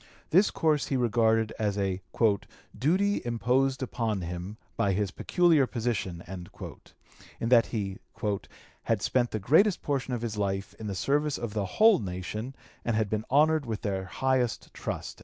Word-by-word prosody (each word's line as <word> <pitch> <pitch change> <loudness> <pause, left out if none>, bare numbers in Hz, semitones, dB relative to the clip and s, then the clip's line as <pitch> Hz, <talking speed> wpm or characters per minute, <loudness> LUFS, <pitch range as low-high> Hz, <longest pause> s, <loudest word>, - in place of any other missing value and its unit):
This 190 +6 +5
course 155 -3 +1
he 135 - 0
regarded 115 -2 +2
as 105 -2 0
a 95 -1 -1 0.7
"duty 190 +9 +2
imposed 130 +3 +1
upon 115 -5 -2
him 90 +4 -5 0.2
by 100 - +1
his 100 0 0
peculiar 165 - +3
position," 110 -8 -2
in 95 +5 -9
that 120 -2 +6
he 100 -3 -3 0.9
"had - - +1
spent 120 -2 +2
the - - -2
greatest 160 - +3
portion 135 -3 -1
of 120 - -5
his 110 -3 -3
life 100 +1 -2
in 110 - -5
the 100 - -3
service 145 +7 +1
of 120 -3 -5
the 105 -2 -1
whole 220 0 +7
nation 105 +6 -5 0.3
and 115 - 0
had 105 -2 0
been 110 0 -1
honored 150 +1 +3
with 110 -2 -4
their 95 -2 -2
highest 125 +4 -1
trust." - - -5
115 Hz, 160 wpm, -28 LUFS, 100-135 Hz, 0.9 s, whole